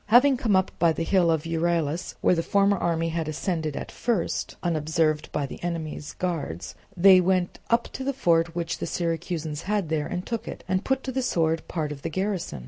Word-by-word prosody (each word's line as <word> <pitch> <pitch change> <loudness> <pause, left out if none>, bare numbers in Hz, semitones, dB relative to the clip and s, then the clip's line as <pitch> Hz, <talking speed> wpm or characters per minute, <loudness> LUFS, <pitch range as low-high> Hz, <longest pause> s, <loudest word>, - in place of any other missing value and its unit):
Having 250 +5 +6
come 220 -5 +2
up 190 0 +2
by 165 -1 +4
the 165 - -2
hill 180 -1 +3
of 160 -1 +1
Euryelus 165 0 -1
(where - - +4
the 165 - +1
former 200 +3 +3
army 165 -2 0
had 165 -1 -2
ascended 155 -1 -2
at - - -6
first) 220 -9 -1
unobserved 155 -2 0
by 145 - -1
the 135 - -9
enemy's 160 -3 -4
guards, 160 - -3 0.2
they 185 +1 +8
went 180 -1 +1
up 235 0 +3
to 265 - -6
the 275 - 0
fort 170 -10 +2
which 170 -1 -2
the - - -3
Syracusans 165 -2 -2
had 205 -6 0
there, 155 -2 0
and 180 0 -4
took 230 -2 -4
it, - - -7
and 185 +1 0
put 265 0 0
to 265 - -3
the 260 +1 -1
sword 165 -9 0
part 155 -3 -2
of 140 -2 -7
the 165 - -3
garrison. 185 - -2
170 Hz, 210 wpm, -26 LUFS, 160-190 Hz, 0.2 s, they